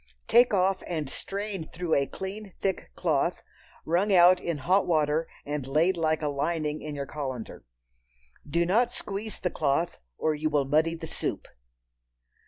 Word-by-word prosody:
Take 240 +1 +6
off 190 -1 +2
and 155 -6 -3
strain 200 -3 -4
through 170 -1 -2
a 140 -1 +3
clean 195 +1 -7
thick 190 -2 -2
cloth, - - 0 0.4
wrung 180 +6 +2
out 180 0 +7
in 170 -4 -2
hot 185 +8 +2
water 155 -1 +2 0.2
and 145 -2 -3
laid 160 +7 +3
like 160 -2 0
a - - +1
lining 150 +1 -1
in 150 -1 -5
your 140 -1 -3
colander. 130 -6 -5 0.9
Do 170 +4 +2
not 225 +7 +3
squeeze 210 -2 -5
the 180 - -1
cloth, 155 +3 0 0.2
or 155 - +1
you 155 +1 -1
will 145 -2 +2
muddy 155 +4 +2
the 165 0 -7
soup. - - -4
165 Hz, 160 wpm, -28 LUFS, 150-190 Hz, 0.9 s, out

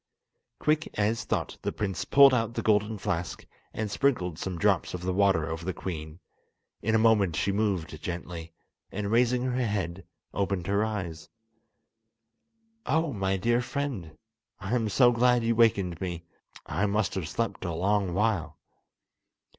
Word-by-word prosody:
Quick 155 +1 +1
as 110 +2 0
thought - - -2
the - - -2
prince 95 -5 -3
pulled 140 -1 +7
out 115 -1 0
the - - -2
golden 105 0 +2
flask, 90 -2 -3 0.3
and 110 -2 -3
sprinkled 95 - 0
some 95 -2 -4
drops 95 -1 +1
of 90 - -7
the 90 0 -1
water 95 -5 +3
over 80 +1 -4
the 95 +1 -3
queen. 80 -2 -6 0.6
In 110 +1 +1
a - - +6
moment 110 -6 +3
she 100 - +1
moved 95 -7 -1
gently, 85 -1 -6 0.4
and 100 +1 -3
raising 125 +1 +3
her 130 0 0
head, 95 -5 -3 0.3
opened 100 -3 -1
her 100 +3 +1
eyes. 90 -7 -4 1.6
"Oh, 160 -2 +1
my 95 -1 0
dear 120 +5 +2
friend, 125 - -4 0.4
I 95 +2 -4
am 115 -3 +1
so 120 +4 +5
glad 120 0 +3
you 115 0 +2
wakened 100 -7 +2
me; 85 -3 -4 0.4
I 105 - 0
must 105 0 0
have 85 -5 -3
slept 115 0 -2
a 90 - -2
long 95 +2 0
while!" 95 -8 0
100 Hz, 155 wpm, -28 LUFS, 90-115 Hz, 1.6 s, pulled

